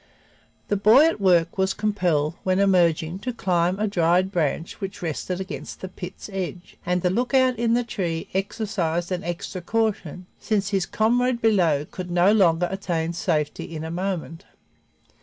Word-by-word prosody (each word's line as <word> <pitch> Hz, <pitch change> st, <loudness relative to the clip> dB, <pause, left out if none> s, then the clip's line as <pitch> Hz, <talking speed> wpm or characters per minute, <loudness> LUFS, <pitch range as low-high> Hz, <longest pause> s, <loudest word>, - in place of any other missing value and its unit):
The 205 Hz, -, +1 dB
boy 220 Hz, +9 st, +6 dB
at 325 Hz, -10 st, 0 dB
work 175 Hz, -1 st, +3 dB
was 190 Hz, 0 st, +1 dB
compelled, 175 Hz, -8 st, 0 dB
when 185 Hz, 0 st, +1 dB
emerging, 175 Hz, -3 st, +2 dB
to 250 Hz, +5 st, -3 dB
climb 180 Hz, -5 st, 0 dB
a 215 Hz, +1 st, 0 dB
dried 180 Hz, 0 st, +2 dB
branch 165 Hz, +2 st, -2 dB
which 195 Hz, -1 st, -6 dB
rested 175 Hz, +3 st, -3 dB
against 155 Hz, -6 st, -7 dB
the 190 Hz, -, -6 dB
pit's 180 Hz, -1 st, -8 dB
edge, 180 Hz, -2 st, -5 dB
and 180 Hz, 0 st, -1 dB
the 180 Hz, -, +2 dB
lookout 250 Hz, +2 st, +2 dB
in 235 Hz, 0 st, +2 dB
the 245 Hz, -, +1 dB
tree 175 Hz, -8 st, -3 dB
exercised 190 Hz, -4 st, -2 dB
an 180 Hz, -1 st, -2 dB
extra 175 Hz, +2 st, -5 dB
caution, 190 Hz, -4 st, -2 dB
since 205 Hz, -3 st, 0 dB
his 195 Hz, -3 st, 0 dB
comrade 245 Hz, +2 st, +1 dB
below 175 Hz, -10 st, +2 dB
could 180 Hz, +2 st, -7 dB
no 175 Hz, +3 st, +4 dB
longer 175 Hz, -5 st, +3 dB
attain 170 Hz, -4 st, -2 dB
safety 165 Hz, -2 st, -2 dB
in 155 Hz, -, -5 dB
a 160 Hz, -, -5 dB
moment. 175 Hz, -1 st, -4 dB
185 Hz, 160 wpm, -24 LUFS, 170-205 Hz, -, boy